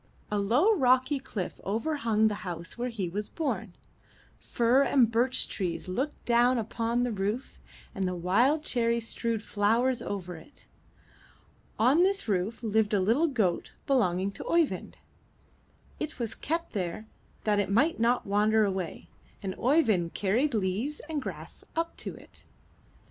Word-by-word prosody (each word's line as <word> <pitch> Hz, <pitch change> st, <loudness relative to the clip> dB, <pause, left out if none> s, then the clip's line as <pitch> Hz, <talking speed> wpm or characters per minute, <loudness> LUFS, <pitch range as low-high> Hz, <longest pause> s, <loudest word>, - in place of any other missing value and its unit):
A 210 Hz, -, +1 dB
low, 250 Hz, -, +3 dB
rocky 260 Hz, -3 st, +3 dB
cliff 205 Hz, -8 st, -5 dB
over 230 Hz, +10 st, -1 dB
hung 220 Hz, -4 st, +2 dB
the 210 Hz, -1 st, -3 dB
house 170 Hz, -4 st, -6 dB
where 245 Hz, +1 st, -2 dB
he 210 Hz, -6 st, -3 dB
was 205 Hz, +5 st, -4 dB
born; 225 Hz, -, -3 dB, 0.6 s
fir 240 Hz, +3 st, +2 dB
and 255 Hz, -5 st, +4 dB
birch 245 Hz, +3 st, +2 dB
trees 180 Hz, -2 st, -3 dB
looked 260 Hz, +11 st, -3 dB
down 245 Hz, +1 st, +4 dB
upon 230 Hz, +2 st, -1 dB
the 245 Hz, -, 0 dB
roof, 210 Hz, +5 st, -3 dB, 0.3 s
and 190 Hz, -1 st, -1 dB
the 180 Hz, -, -2 dB
wild 240 Hz, -, +2 dB
cherry 235 Hz, -4 st, +1 dB
strewed 230 Hz, -1 st, -3 dB
flowers 230 Hz, +5 st, +1 dB
over 180 Hz, -4 st, -5 dB
it. 285 Hz, -, -16 dB, 1.1 s
On 260 Hz, +9 st, +4 dB
this 390 Hz, -2 st, +2 dB
roof 205 Hz, +4 st, -1 dB
lived 220 Hz, -1 st, +2 dB
a -, -, +3 dB
little 230 Hz, -, +3 dB
goat 215 Hz, -, 0 dB
belonging 195 Hz, -, +1 dB
to -, -, -8 dB
Oeyvind; 335 Hz, -3 st, 0 dB, 1.0 s
it 310 Hz, 0 st, -4 dB
was 230 Hz, -3 st, -3 dB
kept 330 Hz, +7 st, -3 dB
there 185 Hz, +2 st, -3 dB, 0.4 s
that 210 Hz, -1 st, +2 dB
it 200 Hz, -, 0 dB
might 275 Hz, +10 st, +2 dB
not 235 Hz, +2 st, +2 dB
wander 210 Hz, +2 st, +3 dB
away, 190 Hz, -4 st, -4 dB, 0.4 s
and 190 Hz, -1 st, -2 dB
Oeyvind 225 Hz, -, +2 dB
carried 235 Hz, +8 st, +1 dB
leaves 215 Hz, +9 st, -1 dB
and 305 Hz, -3 st, -2 dB
grass -, -, -8 dB
up 330 Hz, +1 st, -1 dB
to -, -, -6 dB
it. -, -, -15 dB
225 Hz, 150 wpm, -28 LUFS, 200-260 Hz, 1.1 s, and